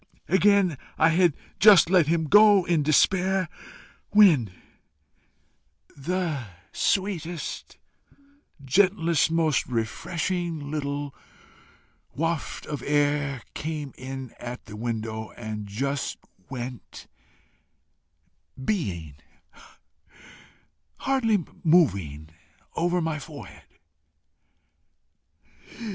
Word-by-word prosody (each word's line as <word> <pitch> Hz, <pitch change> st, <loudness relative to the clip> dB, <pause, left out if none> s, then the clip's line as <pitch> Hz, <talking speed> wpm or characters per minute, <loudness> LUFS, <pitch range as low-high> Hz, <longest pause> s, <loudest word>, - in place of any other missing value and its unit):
Again 190 Hz, -4 st, +3 dB, 0.2 s
I 160 Hz, -, +5 dB
had 170 Hz, -2 st, +3 dB, 0.2 s
just 200 Hz, -5 st, +8 dB
let 180 Hz, -5 st, +5 dB
him 165 Hz, 0 st, +1 dB
go 205 Hz, +1 st, +6 dB
in 170 Hz, -3 st, +2 dB
despair, 185 Hz, +5 st, +2 dB, 0.6 s
when 165 Hz, -, +5 dB, 1.4 s
the 160 Hz, -1 st, -2 dB, 0.3 s
sweetest, 175 Hz, -4 st, -2 dB, 0.9 s
gentlest, 170 Hz, +1 st, +3 dB
most 160 Hz, -3 st, +1 dB
refreshing 155 Hz, +6 st, -3 dB
little 145 Hz, -1 st, -3 dB, 1.0 s
waft 165 Hz, +2 st, -2 dB
of 145 Hz, -4 st, -5 dB
air 145 Hz, -2 st, 0 dB
came 150 Hz, -3 st, -5 dB
in 130 Hz, -1 st, -7 dB
at 120 Hz, +1 st, -7 dB
the 105 Hz, -, -10 dB
window 110 Hz, -1 st, -4 dB
and 110 Hz, -3 st, -6 dB
just 140 Hz, +7 st, -3 dB, 0.3 s
went 125 Hz, -1 st, -7 dB, 1.5 s
BEING, 95 Hz, -, -3 dB, 1.8 s
hardly 225 Hz, -, +1 dB, 0.2 s
moving, 95 Hz, -, +2 dB, 0.5 s
over 175 Hz, +1 st, +1 dB
my 160 Hz, -2 st, -2 dB
forehead. 145 Hz, 0 st, -11 dB
155 Hz, 75 wpm, -25 LUFS, 130-180 Hz, 1.8 s, just